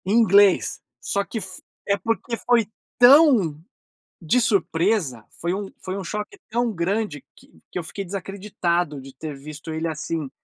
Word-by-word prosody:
Inglês, 200 -2 +4 0.2
só 200 - -1
que 225 - -6
f 185 -2 -9 0.3
é 200 - +3
porque 230 +4 -2
foi 240 -2 +2 0.3
tão 245 - +6 0.6
de 175 +10 +2
surpresa, 175 - +1 0.2
foi 170 +1 -1
um 200 +1 -3 0.2
foi 185 +1 -4
um 195 - -4
choque 210 - -5
tão 235 0 0
grande 180 -3 -2
que - - -19 0.2
que - - -3
eu - - -4
fiquei 195 +4 -6
desacreditado 180 -4 -2
de 135 0 -12
ter 150 +1 -6
visto 150 +3 -8
ele 160 +1 -2
assim. 155 -1 -3
190 Hz, 155 wpm, -23 LUFS, 160-215 Hz, 0.6 s, tão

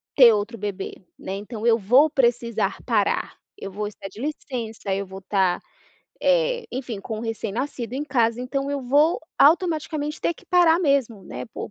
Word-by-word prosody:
ter 245 -5 +8
outro 215 +3 -2
bebê, 200 -2 -4 0.2
né, 190 - -6
então 210 +2 -6
eu 230 -1 +5
vou 250 +9 +5
precisar 235 -6 +1
parar, 215 -5 0 0.2
eu 195 - -7
vou 210 +2 -3
estar 200 -1 -8
de 200 - -13
licença, 235 -8 -4
eu 200 0 -2
vou 190 +1 -9
estar, 190 -2 +1 0.6
eh, - - +2
enfim, 245 -5 -5
com 215 +2 -5
o - - -6
recém-nascido 235 +2 -4
em 285 +3 -2
casa. 235 -4 +1
Então 275 +2 -2
eu 285 -1 -2
vou, 290 +6 +3 0.2
automaticamente, 310 -1 +2
ter 340 - 0
que - - -19
parar 345 -2 +5
mesmo, 275 - +1
né, - - -6
por 225 - -7
240 Hz, 175 wpm, -24 LUFS, 210-290 Hz, 0.6 s, ter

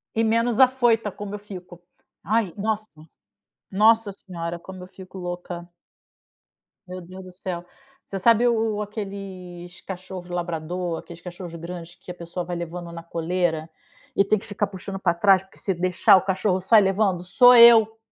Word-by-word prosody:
E 225 - +2
menos 230 +1 +1
afoita, 240 -5 +3
como 205 +1 -7
eu - - -7
fico. 180 -4 -11 0.4
Ai, 210 -2 0
nossa. 210 -6 -4 0.7
Nossa 220 +1 +4
senhora, 170 -3 -6
como 185 +1 -11
eu - - -9
fico 190 0 -12
louca. 175 -1 -6 1.2
Meu 185 0 -7
Deus 185 +2 -11
do 185 - -11
céu. 180 -1 -6 0.4
Você 195 - -5
sabe 230 +4 +4
o 225 -2 +1
o - - -2
aqueles 195 -4 -8
cachorros 185 -1 -8
labrador, 175 0 -3
aqueles 170 0 -12
cachorros 175 -1 -9
grandes 170 +1 -8
que 185 - -17
a - - -6
pessoa 175 0 -6
vai 175 +1 -4
levando 170 0 -6
na 170 0 -9
coleira, 165 -1 -2 0.5
e - - +4
tem 205 +2 +1
que 215 - -14
ficar 205 0 -2
puxando 195 0 -7
para 175 -3 +1
trás, 190 +1 +4
porque 190 - -19
se 195 - -1
deixar 185 +2 +4
o - - +1
cachorro 190 0 0
sai 215 +3 +5
levando? 195 -2 +1
Sou 245 +7 +6
eu. 225 -2 +7
185 Hz, 170 wpm, -23 LUFS, 175-210 Hz, 1.2 s, eu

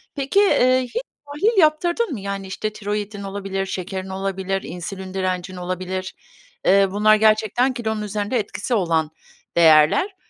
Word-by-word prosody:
Peki, 280 +8 +1
eee, 255 -10 +4
hiç 465 - -4 0.2
tahlil 335 +11 0
yaptırdın 340 +6 +2
mı? 235 - -5
Yani, 195 0 -5
işte, 215 +3 -4
tiroidin 205 0 -4
olabilir, 195 -1 -4
şekerin 190 0 -5
olabilir, 195 0 -2
insülin 185 +2 -7
direncin 185 -1 -2
olabilir. 185 +1 -4 0.5
Eee, 195 0 +5
bunlar 215 +2 +4
gerçekten 220 +4 +2
kilonun 220 -2 -3
üzerinde 210 +3 -2
etkisi 210 +3 -4
olan 165 -6 +1 0.5
değerler. 160 - +5
200 Hz, 135 wpm, -21 LUFS, 190-235 Hz, 0.5 s, Eee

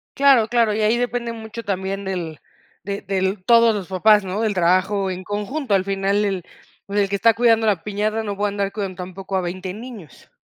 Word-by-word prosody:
Claro, 270 -5 +5
claro, 235 -3 +2
y 220 - -1
ahí 215 +2 +3
depende 240 -1 -2
mucho 225 0 -8
también 195 -1 -3
del 175 -5 -4 0.4
de 200 +2 -4
del 190 0 -2
todos 230 -1 +5
los 200 -4 -4
papás, 205 +3 +4
¿no? 190 +3 -3
Del 220 -2 +1
trabajo 190 +2 +2
en 185 0 -5
conjunto. 210 +6 -3
Al 190 -1 +2
final, 195 +1 0
el, 190 -3 -2 0.4
pues, 200 +1 -2
el 200 - +2
que 200 - -1
está 225 +4 +4
cuidando 225 0 +3
la 195 -6 +1
piñata 210 +2 -1
no 205 -2 -4
puede 205 +1 0
andar 200 -1 -1
cuidando 195 -3 -4
tampoco 190 +1 -5
a - - 0
20 185 +1 -5
niños. 215 - -11
200 Hz, 205 wpm, -21 LUFS, 190-220 Hz, 0.4 s, Claro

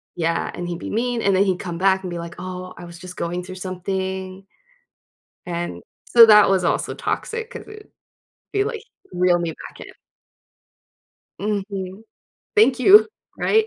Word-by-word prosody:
yeah. 165 0 -1
And 175 - -5
he'd 175 -1 -4
be - - -6
mean 240 +1 -1
and 195 -2 +2
then 190 - +4
he'd 190 -3 0
come 175 -2 -5
back 190 +1 +3
and 185 - -5
be 175 - -5
like, 170 0 -7
"Oh, 185 0 -7
I 175 - -9
was 170 0 -11
just 180 +1 -10
going 175 +1 -3
through 185 +1 -9
something." 190 +1 -4 1.0
And 170 - -4 0.3
so, 235 -1 +9
that 210 -2 +7
was 190 -2 +2
also - - 0
toxic 455 0 -3
'cause - - -9
it'd 425 0 -12 0.6
be, 400 - +2
like, 445 0 -4 0.3
reel 180 -1 +2
me 170 -1 -2 0.2
back - - -15
in. - - -12 1.5
Mhm. 200 -1 -4 0.5
Thank 275 - +5
you. 390 - +7 0.3
Right? 440 0 +3
190 Hz, 165 wpm, -22 LUFS, 175-215 Hz, 1.5 s, so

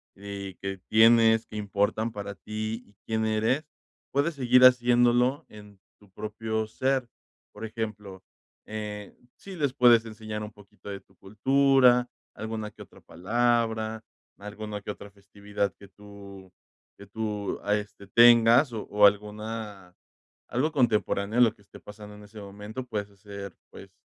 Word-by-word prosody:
y 100 -1 -8
que 95 -1 -6
tienes 115 0 +5
que - - -12
importan 105 +2 -1
para 100 -2 -6
ti 110 +3 -5
y 100 - -25
quién 110 0 -1
eres. 110 +7 0 0.5
Puedes 145 +5 0
seguir 125 -1 +4
haciéndolo 125 +1 +4
en 105 -2 -15 0.2
tu 105 - -22
propio 110 +2 -4
ser, 130 +3 -1 0.5
por 105 +2 -7
ejemplo, 105 -4 -6 0.4
eh, 105 -1 -7 0.2
sí 195 -1 -11
les 145 -6 -1
puedes 120 -3 +5
enseñar 110 -1 -7
un 105 - -7
poquito 105 -1 -15
de 100 -1 -5
tu - - -30
cultura, 125 +3 +3 0.2
alguna 110 -1 -5
que - - -16
otra - - -14
palabra, 110 +1 -1 0.4
alguna 105 0 -7
que - - -10
otra 100 0 -11
festividad 100 0 -4
que 100 - -13
tú 100 -1 -14 0.5
que 100 - -12
tú 105 0 -4
a 105 +1 +1
este 105 -1 -7
tengas 120 +4 +6
o 110 - -4
o 105 0 +5
alguna 105 -2 -2 0.6
algo 140 +6 0
contemporáneo 110 -6 0
de - - +8
lo 110 - 0
que - - -25
esté 100 - -15
pasando 105 0 -12
en 105 - -13
ese 105 +1 -13
momento 105 +4 -8
puedes 105 -3 -4
hacer, 100 -1 -10 0.2
pues, - - -13
110 Hz, 150 wpm, -27 LUFS, 100-115 Hz, 0.6 s, de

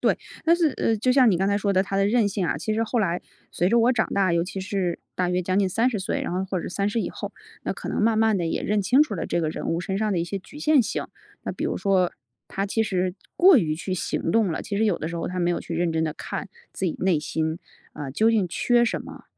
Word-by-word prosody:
对， - - +2 0.3
但 335 +1 +5
是， 340 -3 +3
呃， 225 - +1
就 240 +5 +1
像 255 -1 +6
你 180 - +2
刚 195 +3 +1
才 200 - +2
说 200 -1 0
的 190 0 +3
她 195 0 -3
的 195 0 +3
韧 225 -1 +3
性 195 -2 -1
啊， - - 0
其 215 - -2
实 225 +1 +1
后 235 +1 -1
来 180 -3 0 0.3
随 180 - +1
着 235 - +4
我 245 +3 +4
长 220 -2 +1
大， 190 -3 +2
尤 170 0 +2
其 190 +2 -5
是 190 -3 -2 0.2
大 180 -1 +1
约 180 +1 0
将 185 +2 0
近 195 -2 +2
30 225 +3 +1
岁， 190 - -2
然 - - -3
后 185 +1 -1
或 190 -1 -2
者 - - -5
30 205 +4 -1
以 - - -3
后， - - -6 0.3
那 - - -1
可 - - -7
能 - - -1
慢 225 +1 +3
慢 220 -1 +3
地 170 - -1
也 165 - -2
认 210 0 +1
清 250 +9 +5
楚 265 -9 -3
了 175 - -3
这 175 - 0
个 160 - 0
人 - - -5
物 165 +1 0
身 190 +2 -2
上 215 -1 0
的 175 - 0
一 170 - -1
些 195 +3 -4
局 290 +10 -13
限 305 -2 +4
性。 - - -3 0.4
那 - - -3
比 - - -4
如 - - -1
说 190 -3 +2 0.3
她 195 - -3
其 220 +3 0
实 185 -3 -1 0.2
过 365 -4 +7
于 155 -7 0
去 185 +4 -5
行 165 -2 -2
动 215 -4 +2
了， - - -3
其 200 - -4
实 220 - +3
有 205 -5 +1
的 155 - -3
时 170 - -5
候 165 - -3
她 180 0 -3
没 175 0 +2
有 175 - 0
去 170 - -6
认 170 0 +1
真 160 0 +1
地 155 - -2
看 - - -6 0.2
自 190 - -2
己 165 - -1
内 180 -4 +2
心， 160 +1 -2 0.3
啊， 145 - -6
究 220 +11 +3
竟 215 -5 +2
缺 240 +7 +2
什 235 - -1
么？ - - -11
195 Hz, 305 characters per minute, -24 LUFS, 175-220 Hz, 0.4 s, 过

